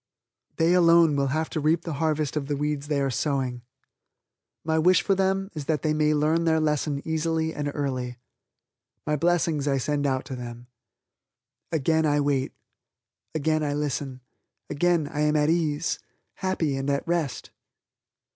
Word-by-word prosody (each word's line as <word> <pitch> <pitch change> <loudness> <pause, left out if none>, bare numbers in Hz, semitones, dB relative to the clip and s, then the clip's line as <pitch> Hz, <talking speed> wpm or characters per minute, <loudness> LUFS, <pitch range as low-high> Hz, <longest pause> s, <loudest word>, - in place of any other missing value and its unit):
They 165 +2 +3
alone 170 -3 +5
will 140 -1 +1
have 155 +4 -1
to 155 - -2
reap 155 +2 +1
the 165 - -4
harvest 155 -2 0
of 145 -2 -2
the 145 -1 -1
weeds 150 0 -2
they 145 -2 0
are 135 -1 0
sowing. 125 0 -1 1.0
My 160 0 +1
wish 180 +3 +4
for 200 - +2
them 195 +1 0
is 150 -4 -6
that 150 -1 -1
they 155 -1 +2
may 155 0 +2
learn 155 +3 +2
their 160 -1 +3
lesson 150 -2 0
easily 160 0 0
and 145 -1 -3
early. 130 -4 -3 0.9
My 150 - +1
blessings 160 -2 +1
I 135 -1 +2
send 145 +2 0
out 130 -1 -1
to 130 - -6
them. 120 -1 -8 1.1
Again 160 0 +2
I 145 0 +2
wait. 140 -2 0 0.8
Again 155 +1 +1
I 145 -1 -1
listen. 140 -3 -3 0.5
Again 170 0 +2
I 145 - -5
am 150 0 +2
at 150 +1 +3
ease, 160 -2 0 0.4
happy, 175 -7 -1
and 135 +1 -2
at 140 +2 -1
rest. 165 -5 -2
150 Hz, 165 wpm, -26 LUFS, 140-160 Hz, 1.1 s, alone